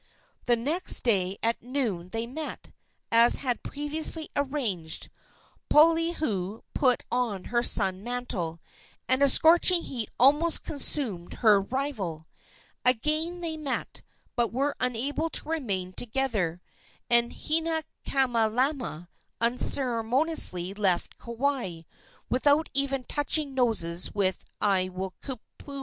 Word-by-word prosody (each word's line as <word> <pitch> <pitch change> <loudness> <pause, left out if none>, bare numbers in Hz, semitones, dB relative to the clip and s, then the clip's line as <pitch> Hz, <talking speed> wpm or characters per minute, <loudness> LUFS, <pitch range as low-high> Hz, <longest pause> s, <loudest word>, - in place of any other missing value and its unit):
The 240 - +3
next 295 +11 +3
day 195 -5 0
at 230 +1 0
noon 235 -9 -3
they 225 +4 -3
met, 295 +6 -7 0.4
as 230 +1 +6
had 250 -3 -2
been - - -8
previously 310 +2 +2
arranged. 240 - -1 0.6
Poliahu 305 - +1
put 255 -3 +1
on 235 -6 -2
her 240 - +2
sun 190 -4 +4
mantle, 220 -9 -3 0.5
and 260 +1 +1
a 280 - +5
scorching 340 +4 +5
heat 235 -5 -5
almost 295 +6 +3
consumed 250 - -2
her 205 -2 +6
rival. 195 - -4 0.6
Again 310 +8 0
they 325 -2 -3
met, 290 -4 -4 0.3
but 240 -2 0
were 275 +5 -1
unable 260 +6 -2
to 300 - +2
remain 200 - -3
together, 215 -8 -1 0.5
and 235 0 +3
Hinaikamalama 265 - -1 0.3
unceremoniously 235 - +2
left 195 -4 0
Kauai, 235 -8 -3 0.5
without 290 +5 +1
even 275 -1 0
touching 290 +1 +1
noses 200 -9 +1
with 190 -3 -1 0.2
Aiwohikupua. 190 +5 -3
245 Hz, 105 wpm, -26 LUFS, 200-290 Hz, 0.6 s, as